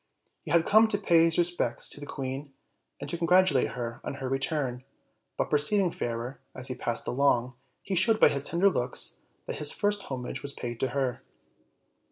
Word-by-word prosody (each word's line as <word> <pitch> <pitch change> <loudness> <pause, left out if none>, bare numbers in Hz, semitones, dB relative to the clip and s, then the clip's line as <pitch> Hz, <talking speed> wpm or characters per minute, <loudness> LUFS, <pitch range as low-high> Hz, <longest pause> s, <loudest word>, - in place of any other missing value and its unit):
He - - -10
had 170 -1 +3
come 220 +2 +6
to 215 -2 0
pay 170 -5 +4
his 165 -1 +1
respects 175 0 0
to - - -6
the 145 - -8
queen, 135 +1 -5 0.5
and - - -6
to 170 - -4
congratulate 175 -5 +3
her 120 -1 -5
on - - -4
her 135 -2 -5
return; 135 -2 -1 0.5
but, - - -1
perceiving 170 +5 +3
Fairer 120 +1 -4 0.2
as 130 0 -4
he - - -2
passed 120 -1 -3
along, 125 -2 +2 0.3
he 195 - -4
showed 215 +5 +3
by - - +7
his 140 -1 -1
tender 170 +6 +2
looks 125 -6 -1 0.2
that - - -5
his 150 -1 +4
first 205 0 0
homage 125 -2 -5
was 140 0 -4
paid 120 -3 -6
to 135 - +1
her. 130 -1 -2
140 Hz, 190 wpm, -28 LUFS, 125-175 Hz, 0.5 s, by